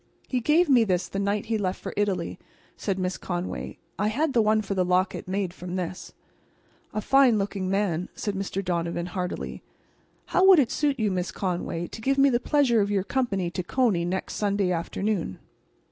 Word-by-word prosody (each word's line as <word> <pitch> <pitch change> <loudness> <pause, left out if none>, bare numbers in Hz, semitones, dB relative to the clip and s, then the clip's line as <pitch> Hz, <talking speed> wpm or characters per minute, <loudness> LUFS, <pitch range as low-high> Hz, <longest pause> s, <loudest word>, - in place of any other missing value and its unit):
"He 255 - 0
gave 310 +8 +3
me 255 -5 +5
this 185 -4 0
the 195 - -4
night 200 +1 0
he 220 -1 -1
left 185 -2 -1
for - - -6
Italy," 205 -2 -1 0.4
said 195 -3 -2
Miss 185 0 -2
Conway. 175 0 -4 0.2
"I 210 - +2
had 280 +7 0
the 235 - +4
one 215 0 +3
for 200 - -3
the 185 -1 +2
locket 180 +1 0
made 190 -1 -2
from 180 0 -6
this." 180 0 -5 0.8
"A 215 - -2
fine 265 -1 +5
looking 195 -2 -2
man," 185 -3 0
said 205 - -2
Mr. 195 0 -3
Donovan, 170 -1 -1
heartily. 180 0 -4 0.6
"How 370 - +2
would 380 -2 +9
it 275 -6 +3
suit 290 -3 0
you, 215 -2 +1
Miss 180 -1 -2
Conway, 175 -2 -2
to 220 - -9
give 275 +4 +1
me 275 0 +5
the 240 - +2
pleasure 250 -4 +3
of 200 - 0
your 200 -2 +1
company 200 -8 -1
to 180 - -2
Coney 200 -2 +1
next 185 +2 -3
Sunday 200 -2 +1
afternoon?" 175 - -2
200 Hz, 190 wpm, -26 LUFS, 180-230 Hz, 0.8 s, would